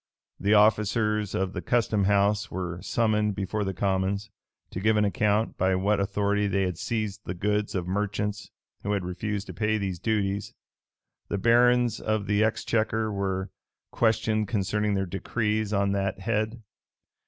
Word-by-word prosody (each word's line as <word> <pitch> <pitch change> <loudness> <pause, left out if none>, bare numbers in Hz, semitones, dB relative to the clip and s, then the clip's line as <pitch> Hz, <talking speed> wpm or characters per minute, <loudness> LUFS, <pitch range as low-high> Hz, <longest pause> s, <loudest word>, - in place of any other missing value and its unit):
The 105 +2 +3
officers 105 0 +2
of 95 +1 -1
the - - -4
custom 110 -4 +1
house 100 +2 +2
were 90 -1 -4
summoned 105 -3 +1
before 100 +2 -2
the 95 - -1
commons, 100 +2 -1 0.4
to - - -4
give 110 +2 +2
an 105 - +3
account 105 +2 +1
by 95 0 +3
what 100 +3 +1
authority 100 +1 +1
they 100 0 +1
had 90 -2 -2
seized 110 -2 -2
the 90 - -4
goods 105 +3 -1
of 90 -2 -1
merchants 105 +1 -2 0.3
who 105 - -1
had 100 -3 -1
refused 100 +3 -3
to - - -8
pay 110 0 0
these 95 -4 -3
duties: 100 -1 -1 0.7
the 100 - -2
barons 120 +2 +4
of 110 -2 -1
the 105 +1 +2
exchequer 110 0 0
were 95 -1 -2 0.4
questioned 110 -1 +1
concerning 105 +1 0
their 95 0 0
decrees 105 +3 -1
on 100 -1 +1
that 95 -1 -1
head. 110 +2 -1
105 Hz, 155 wpm, -27 LUFS, 95-110 Hz, 0.7 s, barons